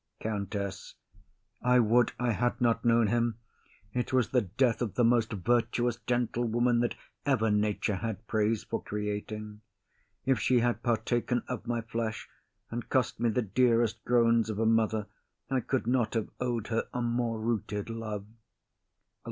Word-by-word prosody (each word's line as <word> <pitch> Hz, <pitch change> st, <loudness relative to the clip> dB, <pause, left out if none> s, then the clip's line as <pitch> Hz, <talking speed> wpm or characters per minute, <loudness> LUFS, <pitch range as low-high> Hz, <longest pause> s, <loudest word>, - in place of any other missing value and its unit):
COUNTESS. 100 Hz, -2 st, -4 dB, 0.7 s
I 125 Hz, 0 st, +4 dB
would 120 Hz, +1 st, +3 dB
I 120 Hz, -1 st, +1 dB
had 120 Hz, +2 st, 0 dB
not 120 Hz, -2 st, +2 dB
known 115 Hz, -1 st, +4 dB
him; 115 Hz, +1 st, +1 dB, 0.6 s
it 125 Hz, -1 st, -1 dB
was 130 Hz, -3 st, +2 dB
the 125 Hz, -, +3 dB
death 115 Hz, +5 st, +1 dB
of 115 Hz, -5 st, -2 dB
the 120 Hz, -, +3 dB
most 115 Hz, -1 st, +3 dB
virtuous 120 Hz, +3 st, +1 dB
gentlewoman 120 Hz, 0 st, +1 dB
that 120 Hz, 0 st, 0 dB, 0.3 s
ever 120 Hz, -6 st, +2 dB
nature 105 Hz, -1 st, +1 dB
had 110 Hz, 0 st, -4 dB
praise 110 Hz, 0 st, +1 dB
for -, -, -3 dB
creating. 105 Hz, 0 st, -4 dB, 0.6 s
If 130 Hz, -3 st, +2 dB
she 125 Hz, +2 st, +3 dB
had 120 Hz, 0 st, 0 dB
partaken 120 Hz, +1 st, 0 dB
of 125 Hz, -4 st, -5 dB
my 120 Hz, -1 st, 0 dB
flesh 115 Hz, -1 st, -4 dB, 0.4 s
and 120 Hz, +1 st, -5 dB
cost 130 Hz, -4 st, +1 dB
me 120 Hz, 0 st, +2 dB
the 120 Hz, +2 st, +1 dB
dearest 115 Hz, 0 st, +2 dB
groans 115 Hz, -2 st, +3 dB
of 110 Hz, -, -3 dB
a 110 Hz, -, +1 dB
mother, 110 Hz, -1 st, +2 dB, 0.5 s
I 135 Hz, -, +3 dB
could 130 Hz, 0 st, -1 dB
not 120 Hz, -2 st, +1 dB
have 110 Hz, -, -1 dB
owed 120 Hz, -3 st, -2 dB
her 115 Hz, -1 st, 0 dB
a 125 Hz, -, -2 dB
more 120 Hz, -1 st, 0 dB
rooted 110 Hz, -3 st, -2 dB
love. 110 Hz, -3 st, -5 dB
115 Hz, 155 wpm, -30 LUFS, 110-120 Hz, 0.7 s, I